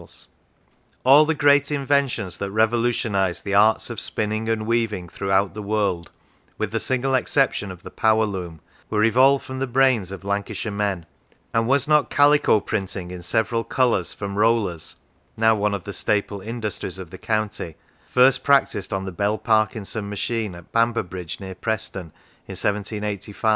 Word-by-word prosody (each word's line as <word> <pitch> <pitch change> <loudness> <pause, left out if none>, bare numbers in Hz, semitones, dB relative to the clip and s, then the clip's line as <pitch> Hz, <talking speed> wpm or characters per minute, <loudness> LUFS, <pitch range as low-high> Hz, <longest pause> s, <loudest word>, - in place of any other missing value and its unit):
39 - - -15
Lancashire - - -14 0.8
All 140 +4 +7
the 160 +1 0
great 145 0 +4
inventions 135 - 0
that 100 - -3
revolutionised 110 -3 +1
the 100 - -2
arts 105 +2 +3
of - - -5
spinning 110 +1 -1
and 110 -1 -1
weaving 110 -5 -1
throughout 95 +2 0
the 105 - -6
world, 100 -4 -1 0.5
with - - -2
the - - -1
single 130 +1 0
exception 130 -4 +1
of 90 -2 -10
the - - -9
power 110 0 +2
loom, 90 -6 -6 0.3
were 105 -1 +1
evolved 130 +5 +4
from 130 -1 -6
the 135 - -1
brains 125 -6 +2
of 95 0 -8
Lancashire 100 +2 -3
men; 100 -4 -2 0.5
and 115 0 +1
was 140 +1 +2
nt 150 -4 +3
calico 145 -5 +4
printing 95 -3 -4
in 90 -1 -7
several 110 +6 0
colours 115 -6 +1
from 100 0 -5
rollers 105 -7 +1 0.4
(now 110 0 +4
one 105 -1 0
of 95 - -6
the 100 - -7
staple 100 +1 -1
industries 105 -4 -5
of 90 -3 -9
the 95 - -10
county) 110 -6 -2 0.3
first 130 +1 +4
prac 140 -1 +5
tised 100 - -5
on 95 0 -2
the 95 - -5
Bell 100 +4 0
Parkinson 110 -2 0
machine 105 -1 -3
at 85 -1 -14
Bamberb 115 -5 0
ridge, 90 -3 -6
near 95 -1 -7
Preston, 100 -1 -3 0.4
in - - -7
1785? 105 0 -2
105 Hz, 170 wpm, -23 LUFS, 95-120 Hz, 0.8 s, All